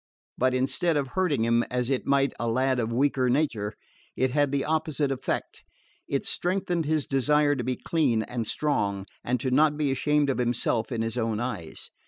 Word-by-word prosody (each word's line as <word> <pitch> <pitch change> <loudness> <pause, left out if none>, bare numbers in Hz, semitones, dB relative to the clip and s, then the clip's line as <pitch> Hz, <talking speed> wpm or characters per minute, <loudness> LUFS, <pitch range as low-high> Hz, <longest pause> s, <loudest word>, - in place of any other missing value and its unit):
But 130 0 +1
instead 150 +6 +1
of 140 -2 -1
hurting 150 -9 +1
him, 115 0 +3
as 125 -1 -1
it 130 - -1
might 140 -1 +2
a 120 - -1
lad 130 +2 +1
of 115 -1 -1
weaker 130 0 +2
nature, 120 -7 0 0.4
it 130 0 +1
had 145 0 +2
the 140 -1 0
opposite 155 -2 0
effect. 135 - -3 0.5
It - - -1
strengthened 175 -2 -1
his 155 -1 0
desire 145 +2 +2
to 125 - -3
be 125 +1 -1
clean 130 -10 +1
and 115 -2 -4
strong, 100 -11 -1 0.2
and 125 +1 0
to 130 +2 -2
not 150 +3 +4
be 145 -3 +1
ashamed 145 +1 +2
of 130 - -3
himself 120 -1 0
in 115 -2 -1
his 115 +2 -2
own 110 -2 -1
eyes. 110 -10 -5
130 Hz, 190 wpm, -27 LUFS, 120-150 Hz, 0.5 s, not